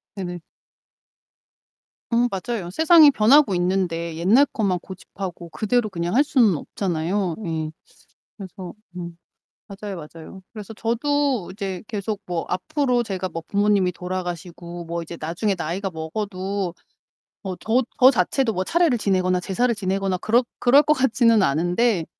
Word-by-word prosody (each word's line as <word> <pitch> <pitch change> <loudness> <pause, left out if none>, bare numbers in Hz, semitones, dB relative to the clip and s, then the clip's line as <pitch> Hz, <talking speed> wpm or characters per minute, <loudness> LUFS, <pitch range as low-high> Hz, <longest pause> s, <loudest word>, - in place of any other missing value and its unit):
네네. 175 -2 -5 1.7
음 240 +1 +3
맞아요. 195 -1 -4
세상이 320 - +7
변하고 255 0 +5
있는데 175 -2 -1
옛날 210 - +4
것만 195 -5 0
고집하고 185 -2 -8
그대로 215 +4 0
그냥 175 +2 -3
할 280 - +6
수는 235 - +3
없잖아요. 175 +2 -2
예. 160 -1 -3 0.7
그래서 190 -3 -9 0.2
음 170 -1 -7 0.5
맞아요, 200 -1 -7
맞아요. 165 +4 -11
그래서 215 0 -9
저도 250 0 0
이제 195 -3 -5
계속 210 -1 -3
뭐 175 -2 -2
앞으로 250 - 0
제가 190 -3 -4
뭐 165 0 -6
부모님이 200 -3 +2
돌아가시고 175 -1 -6
뭐 170 +1 -4
이제 170 +1 -8
나중에 175 +6 -1
나이가 185 +5 -3
먹어도 185 +2 -4 0.7
뭐 190 -3 -5
저 240 +4 +2 0.2
저 260 +1 +8
자체도 235 +3 +1
뭐 185 -2 -2
차례를 335 -8 +2
지내거나 185 -3 +1
제사를 235 +7 0
지내거나 195 -2 -1
그럴 230 +7 +2 0.2
그럴 275 +4 +6
것 305 - +1
같지는 235 -5 +3
않은데 175 - +1
195 Hz, 310 characters per minute, -23 LUFS, 175-230 Hz, 1.7 s, 저